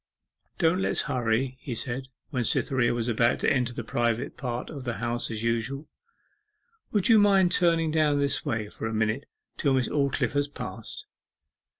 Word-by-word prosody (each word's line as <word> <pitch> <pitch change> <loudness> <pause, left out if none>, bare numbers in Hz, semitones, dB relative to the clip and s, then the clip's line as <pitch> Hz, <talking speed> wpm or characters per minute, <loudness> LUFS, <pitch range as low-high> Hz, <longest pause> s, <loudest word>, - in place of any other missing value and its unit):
'Don't 170 0 +2
let's - - +1
hurry,' 130 -1 -1
he 130 -3 -5
said, 130 +3 -3 0.2
when 125 -4 0
Cytherea 120 +1 +2
was 120 -1 -1
about 115 +1 +2
to - - +3
enter 125 -2 0
the 120 - -5
private 120 +1 -1
path 125 -1 -4
to 145 - -8
the 125 -2 -3
House 120 0 -1
as 110 -1 -4
usual. 115 +6 -1 1.0
'Would 205 -3 +2
you 225 -2 +7
mind 195 -3 +4
turning 165 -2 +3
down 155 -2 +2
this 140 0 +1
way 110 -7 -2
for 110 - -6
a 110 - -4
minute 110 +5 0 0.3
till 140 -3 +2
Miss 130 -2 +1
Aldclyffe 140 -2 0
has 145 0 +1
passed? 115 -6 -7
130 Hz, 175 wpm, -27 LUFS, 115-145 Hz, 1.0 s, you